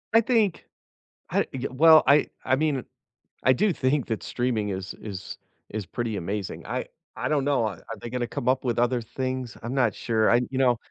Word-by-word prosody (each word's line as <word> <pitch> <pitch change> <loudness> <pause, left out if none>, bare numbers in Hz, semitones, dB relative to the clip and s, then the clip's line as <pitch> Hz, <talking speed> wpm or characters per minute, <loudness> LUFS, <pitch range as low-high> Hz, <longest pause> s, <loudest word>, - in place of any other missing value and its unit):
I 225 - +7
think 225 -6 +1 0.6
I - - +1
y 130 0 -4
well, 155 +4 +7
I 145 +2 +5 0.2
I 130 - +2
mean, 140 -3 0 0.6
I 130 - +6
do 200 +8 +2
think 135 -1 +1
that 110 -2 -2
streaming 120 -4 -1
is 95 -1 -4
is 100 -3 -7 0.3
is 105 -1 -4
pretty 115 +3 -3
amazing, 100 +2 -4
I - - -2 0.3
I - - -2
don't 145 -3 +1
know, 140 -5 +2
a - - -2 0.2
are 115 - -5
they 120 - -6
gonna 125 0 -2
come 120 - -5
up 130 +1 +2
with 120 -3 -1
other 120 0 +2
things? 130 +1 -4
I'm 120 +2 -3
not 120 -7 +2
sure, 110 -2 +1
I 120 - +5
you 130 - -3
know 125 -2 +4
125 Hz, 205 wpm, -26 LUFS, 110-135 Hz, 0.6 s, I